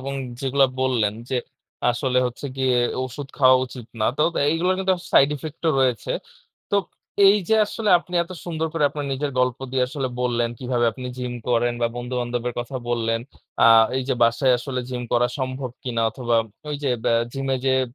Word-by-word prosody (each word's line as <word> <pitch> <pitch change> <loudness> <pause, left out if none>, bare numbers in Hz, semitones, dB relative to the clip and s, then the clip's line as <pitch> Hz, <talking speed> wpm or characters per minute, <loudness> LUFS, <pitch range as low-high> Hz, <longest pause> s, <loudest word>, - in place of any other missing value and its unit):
এবং 135 +1 -5 0.3
যেগুলো 135 0 +3 0.2
বললেন 120 -6 +1 0.2
যে, 130 - +1 0.5
আসলে 125 +1 0
হচ্ছে 125 +4 -6
গিয়ে, 130 -2 +2 0.3
ওষুধ 135 +2 -7
খাওয়া 130 -2 +7
উচিত 125 -2 -10
না। - - +2
তোব 160 +3 +2 0.2
এইগুলার 175 +4 +2
কিন্তু 190 0 +2
আস - - -12
সাইড 140 - +6
ইফেক্ট 155 +3 -9
ও - - +5
রয়েছে। 125 -4 0 0.6
তো 205 - +3 0.5
এই 200 +2 +7
যে 220 - +4
আসলে 215 +1 -3
আপনি 180 +1 -11
এত 170 - -12
সুন্দর 160 -2 -2
করে 160 -3 +1
আপনার 145 -1 -4
নিজের 140 +2 -2
গল্প 125 -1 +1
দিয়ে 130 -1 +2
আসলে 135 -2 -3
বললেন, 120 -1 +1
কিভাবে 125 -2 0
আপনি 125 +3 -7
জিম 125 -1 -3 0.2
করেন 120 0 +2
বা 115 - +4
বন্ধুবান্ধবের 120 -1 -3
কথা 130 +2 -6
বললেন, 115 -1 0 0.4
আ - - +8 0.3
এই 130 - 0
যে - - +2
বাসায় 120 +3 +4
আসলে 130 0 -3
জিম 125 -1 -3
করা 120 0 +4
সম্ভব 130 -1 -3
কি 130 - -4
না? - - +2
অথবা 120 0 0 0.3
ঐ - - -3
যে, 140 - +1
ব্যা 115 - +3 0.2
জিমে 135 -1 -1
যেয়ে 130 0 +3
130 Hz, 190 wpm, -23 LUFS, 120-140 Hz, 0.6 s, আ